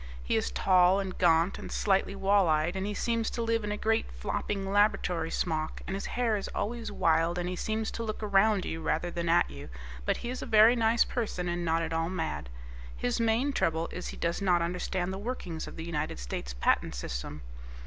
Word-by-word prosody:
He - - 0
is - - +1
tall 180 - +4
and 190 -2 -4
gaunt 170 +1 +3
and - - -8
slightly 195 -1 +1
wall 195 -1 +3
eyed, 155 +4 +1
and 190 +1 -2
he 210 - -2
seems 230 0 0
to 235 - -3
live 230 -1 0
in 210 - -2
a 210 - -2
great, 220 +1 +1
flopping 195 - -3
laboratory 200 -5 +2
smock, 155 -3 -2
and 190 - -3
his 195 - -4
hair 235 -3 +2
is 200 - -4
always 230 0 -3
wild, 165 -2 +2
and 175 0 -2
he 180 - -2
seems 220 +4 -2
to 230 - -4
look 215 -1 -4
around 205 -1 +3
you 160 - -4
rather 175 +2 -1
than 170 -1 -2
at 170 +1 +4
you, 70 0 -9 0.3
but - - 0
he 240 - -2
is 255 - -5
a - - -5
very 220 +1 +7
nice 230 0 +4
person 205 -7 -3
and 175 0 -2
not 165 0 +1
at 165 - -3
all 165 +1 0
mad. 160 - -3 0.5
His 120 - -1
main 230 +5 +2
trouble 165 -7 0
is 180 - -5
he - - -7
does 170 +3 -1
not 180 -3 +3
understand 180 +1 -2
the 190 - -5
workings 195 -8 -5
of - - -9
the 160 - -6
United 155 -2 -3
States - - -5
Patent - - +1
System. - - -5
185 Hz, 220 wpm, -29 LUFS, 165-215 Hz, 0.5 s, very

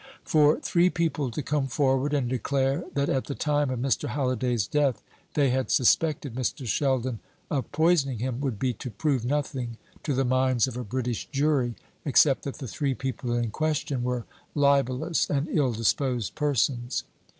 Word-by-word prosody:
For 150 -1 +4
three 175 +1 +3
people 165 -6 -1
to 140 +5 -4
come 145 0 0
forward 135 +1 +1
and 140 -4 +1
declare 135 +2 0
that 140 0 +1
at 130 - 0
the 140 - -4
time 145 -2 +1
of 130 - -2
Mr. 135 +1 0
Halliday's 125 -5 0
death 135 -5 +1 0.3
they 140 -4 +3
had 130 0 0
suspected 145 +1 +2
Mr. 130 +1 -2
Sheldon 130 0 0 0.3
of 135 -3 -2
poisoning 155 -5 +2
him, 125 +2 -3
would 135 -7 -2
be 125 +3 0
to 125 +4 -7
prove 135 0 0
nothing 130 -3 -2 0.2
to 145 - -1
the 135 +1 +1
minds 130 -1 +2
of 130 - -6
a 125 - -3
British 120 +1 -3
jury, 135 -4 +1 0.3
except 140 -1 +4
that 140 - -4
the 130 - -6
three 135 +4 -1
people 130 -2 -3
in 120 -2 -1
question 150 -2 -1
were 125 -1 -2 0.3
libellous 140 +1 +2
and 145 +1 0
ill 140 -6 +2
disposed 120 0 0
persons. 130 -4 0
135 Hz, 170 wpm, -27 LUFS, 125-145 Hz, 0.3 s, For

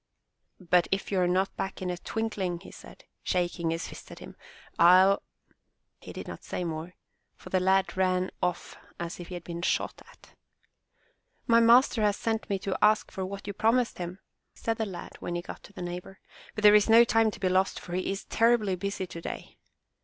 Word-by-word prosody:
''But 180 -1 +2
if 195 +1 -1
you 195 - +1
are 180 - +3
not 185 +2 0
back 195 - -4
in 185 -1 -2
a - - -2
twinkling,'' 195 -7 -3
he - - -12
said, - - -14 0.2
shaking 175 -2 -1
his 165 0 -2
fist - - -11
at - - -10
him, - - -11 0.4
"FU— 185 +3 +7 0.4
" - - -52
He - - -9
did - - -8
not - - -8
say 180 - -4
more, 165 +1 -5 0.4
for - - -13
the 185 - +3
lad 190 +1 +2
ran 185 0 +1
off 180 -1 -2 0.2
as 170 +1 -5
if 175 - -8
he 180 - -7
had 175 - -7
been 170 0 -6
shot - - -1
at. - - -20 1.1
My 230 0 +5
master 235 0 +5
has 210 -1 +2
sent 225 -1 -2
me 200 - +1
to 190 0 -3
ask 215 0 +3
for 190 - -4
what 195 +1 -6
you 205 - -4
promised 230 +3 +1
him," 175 +1 -5 0.4
said 225 -1 -2
the 220 - -1
lad 180 -3 -8
when 175 - -4
he 175 - -3
got - - -9
to 205 - -16
the 180 - -7
neighbor, 180 +2 -7 0.4
*'but 215 - -4
there 210 0 +9
is 210 +1 +5
no 230 +1 +8
time 225 -1 +3
to - - -9
be 190 - 0
lost 185 +1 +1
for 175 - -9
he 185 +1 -1
is 195 - -5
terribly 230 -4 +2
busy 195 0 -3
today." 170 -2 -8
190 Hz, 210 wpm, -28 LUFS, 180-210 Hz, 1.1 s, there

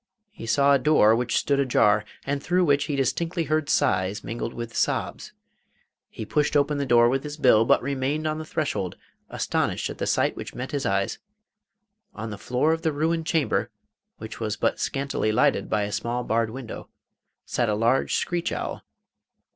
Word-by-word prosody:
He 115 - -9
saw 140 +4 +4
a 140 - +4
door 120 -8 +5
which 120 +1 0
stood 140 -1 +1
ajar, 110 -6 +3 0.2
and 145 0 -2
through 180 +3 +2
which 145 -2 +2
he 145 - -2
distinctly 165 +6 -1
heard 155 -1 -1
sighs, 95 +2 +1
mingled 115 0 -4
with 115 -1 -7
sobs. - - -1 0.8
He 110 - -7
pushed 150 +5 +1
open 145 0 +1
the 140 - -2
door 120 -1 +5
with 135 +2 0
his 150 0 -6
bill, 120 -6 +5
but - - +3
remained 140 +3 -1
on 155 0 -1
the - - -4
threshold, 145 - -2 0.3
astonished - - -1
at - - -10
the - - -2
sight - - +1
which - - -8
met 125 +2 -5
his 140 -1 -1
eyes. 100 0 -1 1.0
On 110 +1 -5
the 105 - -7
floor 130 +6 +1
of 165 - -3
the 160 - +1
ruined 160 +2 -1
chamber 150 -9 +1 0.5
which 110 0 -8
was 110 -2 -2
but - - 0
scantily 140 -5 -1
lighted 135 +6 +2
by 105 - +1
a 100 - -3
small 120 +3 -2
barred 115 0 0
window 120 -1 -8 0.6
sat 120 -3 0
a 105 - +1
large 115 +5 +2
screech 175 -1 -1
owl. - - -4
135 Hz, 185 wpm, -25 LUFS, 115-150 Hz, 1.0 s, door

